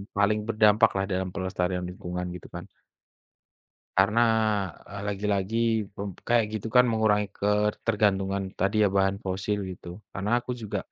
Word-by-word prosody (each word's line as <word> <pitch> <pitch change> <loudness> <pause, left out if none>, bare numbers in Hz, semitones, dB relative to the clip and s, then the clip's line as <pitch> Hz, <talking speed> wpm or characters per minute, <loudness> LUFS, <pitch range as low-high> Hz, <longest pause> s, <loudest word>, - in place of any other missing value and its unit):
paling 100 +1 +2
berdampaklah 110 -2 +4
dalam 95 0 -1
pelestarian 95 -1 -1
lingkungan 90 0 -5
gitu 90 - -9
kan. - - -7 1.3
Karena, 105 +4 +4 0.7
eee, 100 0 -7
lagi-lagi 100 +1 -1 0.4
pem 100 +1 -5 0.2
kayak 120 -1 +4
gitu 110 - -6
kan 125 0 +7
mengurangi 110 -2 +2
ketergantungan 105 -1 +1
tadi 95 +3 0
ya, 105 - +5
bahan 95 0 +1
fosil 95 +2 -2
gitu. 90 +1 -9
Karena 105 +5 0
aku 125 - -8
juga 105 - -3
100 Hz, 130 wpm, -27 LUFS, 95-105 Hz, 1.3 s, kan